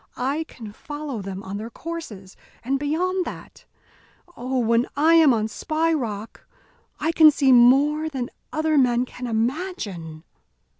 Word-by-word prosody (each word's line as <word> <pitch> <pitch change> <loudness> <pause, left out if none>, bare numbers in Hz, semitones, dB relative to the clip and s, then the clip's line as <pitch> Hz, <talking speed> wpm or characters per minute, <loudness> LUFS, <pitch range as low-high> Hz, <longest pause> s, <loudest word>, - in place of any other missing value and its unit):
I 280 +6 -1
can 225 -8 -11
follow 290 0 -6
them 195 0 -7
on 195 +1 -6
their 220 +2 -6
courses 235 - -8 0.3
and 270 +3 -1
beyond 360 +6 0
that - - -10 0.7
Oh! 255 +2 -3
when 235 0 +2
I 315 +3 +4
am 320 -4 +6
on 220 -2 +1
Spy 315 +9 -1
Rock 220 -7 -4 0.6
I 325 - 0
can 315 -2 +7
see 275 -2 +2
more 280 +6 +5
than 260 -5 -5 0.2
other 310 -1 +1
men 245 -1 +2
can 250 0 -8
imagine." 220 - -3
260 Hz, 145 wpm, -23 LUFS, 225-310 Hz, 0.7 s, can